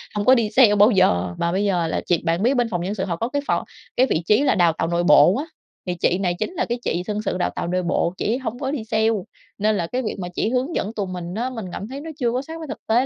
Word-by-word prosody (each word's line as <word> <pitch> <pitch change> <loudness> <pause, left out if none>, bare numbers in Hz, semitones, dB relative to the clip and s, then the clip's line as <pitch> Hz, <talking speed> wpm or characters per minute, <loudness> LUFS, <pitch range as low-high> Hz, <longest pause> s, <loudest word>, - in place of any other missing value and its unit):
hông 205 0 -1
có 260 - +7
đi 225 -3 +1
sale 220 -4 +5
bao 205 +4 +6
giờ 90 - +2
mà 170 0 0
bây 195 +3 0
giờ 175 -4 +1
là - - -2
chị 175 - +2
bạn 170 +4 +1
biết 255 +4 +3
bên 245 -3 +1
phòng 175 -3 -2
Nhân 195 +4 -3
sự 190 -1 -2
họ 170 -3 -2
có 230 +7 -2
cái 285 +1 -1
phò - - 0 0.3
cái 255 - +5
vị 165 -5 0
trí 215 +7 +4
là - - +3
Đào 170 -3 +4
tạo 165 - 0
nội 170 0 0
bộ 180 +1 +6
á, 295 - -3 0.4
thì 180 - -1
chị 175 +1 +1
này 180 -3 0
chính 360 - -3
là - - -1
cái 240 +1 -3
chị 175 +2 -1
Nhân 210 0 -2
sự 195 - -2
đào - - 0
tạo - - -3
nội 180 +1 -1
bộ, 170 0 0
chị - - -3
ấy 245 - +1
hổng 245 -1 -5
có 270 -1 -2
đi 265 -7 -3
sale, 220 0 +1 0.5
nên 210 0 +1
là 170 -2 -2
cái 255 +6 -2
việc 215 - -3
mà 180 - -4
chỉ 220 - 0
hướng 260 +6 -1
dẫn 210 +3 -2
tụi 200 -4 -3
mình 180 -1 -6
á 245 +3 -1
mình 225 -6 -6
cảm 200 - -6
thấy 275 +3 -7
nó 325 - -7
chưa 240 -2 +1
có 250 +2 -1
sát 320 +3 -8
với 315 - -7
thực - - -5
tế 240 +4 +3
210 Hz, 320 wpm, -22 LUFS, 180-245 Hz, 0.5 s, có